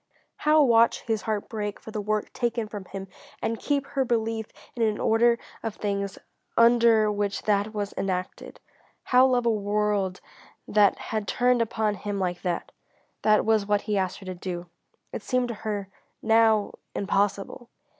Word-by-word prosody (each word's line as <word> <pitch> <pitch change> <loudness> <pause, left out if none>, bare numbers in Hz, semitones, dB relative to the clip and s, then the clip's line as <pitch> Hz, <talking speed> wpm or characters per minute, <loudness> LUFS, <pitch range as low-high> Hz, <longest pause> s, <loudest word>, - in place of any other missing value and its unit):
How 305 0 +4
watch 230 -3 +4
his 220 -2 -1
heart 215 -2 -2
break 210 -2 -4
for 220 - -10
the 215 - -3
work 215 +1 -2
taken 235 -2 -1
from 205 -2 -7
him 195 +1 -7 0.3
and 225 0 -2
keep 285 -1 0
her 275 -1 -1
belief 225 -2 -1 0.3
in 240 - -4
an 215 -2 +1
order 235 +1 +3 0.2
of 225 -2 -4
things 200 -2 -3 0.4
under 230 -2 +5
which 205 -1 -2
that 205 0 +1
was 205 -1 -3
enacted? 185 -1 -4 0.4
How 255 +1 +5
love 250 -2 +1
a 235 - +4
world 205 -2 0 0.5
that 205 -2 +4 0.2
had 215 -2 -1
turned 245 +2 +2
upon 220 -1 0
him 205 0 -4
like 180 -2 -2
that? 180 -2 -3 0.5
That 215 0 +4
was 215 -2 +2
what 205 -1 +2
he 210 - -2
asked 190 -2 -1
her 195 - -12
to 185 - -4
do. 175 -1 -5 0.5
It - - -4
seemed 255 -1 0
to - - -2
her, 205 -3 -3 0.3
now, 220 -2 +3 0.2
impossible. 200 +4 -1
215 Hz, 165 wpm, -26 LUFS, 200-230 Hz, 0.5 s, under